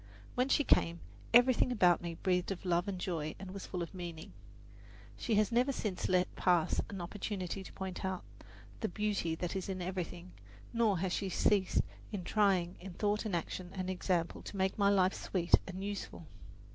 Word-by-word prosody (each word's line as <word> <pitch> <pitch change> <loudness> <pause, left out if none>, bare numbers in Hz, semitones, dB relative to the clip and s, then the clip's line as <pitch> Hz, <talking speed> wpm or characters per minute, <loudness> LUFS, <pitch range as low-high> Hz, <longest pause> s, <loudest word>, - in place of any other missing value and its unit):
When 250 +2 +1
she 290 - +4
came, 170 -9 +3 0.3
everything 245 +1 +6
about 180 -7 +4
me 170 -1 -4
breathed 180 -2 +2
of 195 0 -5
love 175 +1 +2
and 195 -2 -2
joy 160 -4 -2
and 190 0 -8
was 195 0 -7
full 180 -1 -3
of 170 - -8
meaning. 170 -3 -7 0.8
She 225 - 0
has 210 +2 +3
never 245 +4 +3
since 210 -8 -2
let 185 0 +2
pass 175 -3 +3
an 195 - -5
opportunity 190 +1 -4
to - - -11
point 190 -1 -5
out 190 -1 -2 0.6
the 220 - -1
beauty 200 -4 -1
that 175 +3 -3
is 190 0 -3
in 190 -1 -2
everything, 180 -1 -4 0.4
nor 225 -4 +3
has 180 +1 -1
she 195 +3 -1
ceased 195 0 +3 0.4
trying 190 -4 +2
in 185 0 -8
thought 210 +4 0
and 205 -5 -1
action 175 +2 -3
and 185 -1 -2
example 180 -2 -1
to 200 - -7
make 190 0 +1
my 200 -1 +4
life 190 -1 +4
sweet 175 -3 -3
and 190 0 -5
useful. 200 -4 -5
185 Hz, 185 wpm, -34 LUFS, 175-205 Hz, 0.8 s, everything